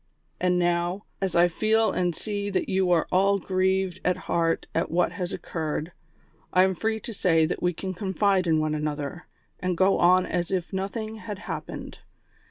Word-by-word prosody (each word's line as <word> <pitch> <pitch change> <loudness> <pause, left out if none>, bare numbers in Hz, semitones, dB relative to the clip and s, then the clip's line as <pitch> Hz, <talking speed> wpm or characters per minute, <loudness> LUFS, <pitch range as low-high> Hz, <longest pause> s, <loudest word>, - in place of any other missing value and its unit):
" - - -43
And 180 0 +2
now, 175 +2 0 0.2
as 190 -3 -1
I 170 +1 +6
feel 220 +5 +2
and 175 -2 0
see 205 +1 -3
that 195 - -1
you 190 -1 +1
are 170 -2 +3
all 195 +2 +4
grieved 190 0 0
at 180 - +1
heart 165 -1 +1
at - - 0
what 170 0 +2
has 180 0 -4
occurred, 160 0 -3 0.6
I 185 - +5
am 190 0 +2
free 220 +4 -1
to 230 - -7
say 165 -5 +3
that 160 - -3
we 180 - +2
can 185 +2 -5
confide 190 0 +1
in 160 -1 +3
one 155 0 0
another, 150 +2 -3 0.3
and 180 -2 -1
go 190 +2 +3
on 180 +1 +5
as 175 -1 -2
if 185 -1 -2
nothing 215 +3 -3
had 210 -2 -6
hap - - -5
pened. - - -8
185 Hz, 190 wpm, -26 LUFS, 170-195 Hz, 0.6 s, I